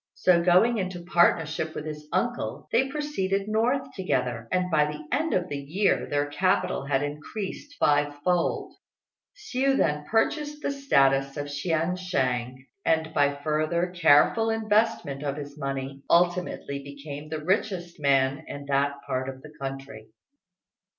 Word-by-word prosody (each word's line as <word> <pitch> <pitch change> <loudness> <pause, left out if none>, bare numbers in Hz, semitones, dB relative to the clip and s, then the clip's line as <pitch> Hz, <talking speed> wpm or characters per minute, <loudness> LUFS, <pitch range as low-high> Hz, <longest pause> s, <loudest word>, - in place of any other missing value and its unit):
So 175 -2 +4
going 190 +7 +4
into 185 -2 -4
partnership 165 -3 +2
with 150 - -5
his 150 -1 -7
uncle, 240 0 -2
they 265 +3 +2
proceeded 205 -10 -1
north 235 +5 +1
together; 125 - -1
and 180 0 0
by 150 -2 +4
the 150 0 -6
end 320 +2 0
of 180 -1 0
the 145 -3 -4
year 170 +9 0
their 145 0 +1
capital 145 0 0
had 140 0 +1
increased 190 - -6
five 145 0 +2
fold. 180 0 0 0.6
Hsiu 275 -9 0
then 150 -1 +1
purchased 295 - 0
the - - 0
status 135 - +2
of 145 0 -4
chien 160 +3 0
shêng, 130 -9 -1 0.3
and 160 0 +1
by 145 -1 +3
further 155 +3 0
careful 170 +7 +5
investment 215 -9 +1
of 145 -1 -3
his 145 -1 -7
money 135 -1 -4
ultimately 175 -5 +1
became 140 +1 -8
the 160 - -3
richest 180 -3 -1
man 140 +1 +2
in 145 0 -7
that 140 +1 +2
part 130 +1 -2
of 130 0 -9
the 150 0 -12
country. 135 -4 -6
155 Hz, 145 wpm, -26 LUFS, 140-190 Hz, 0.6 s, careful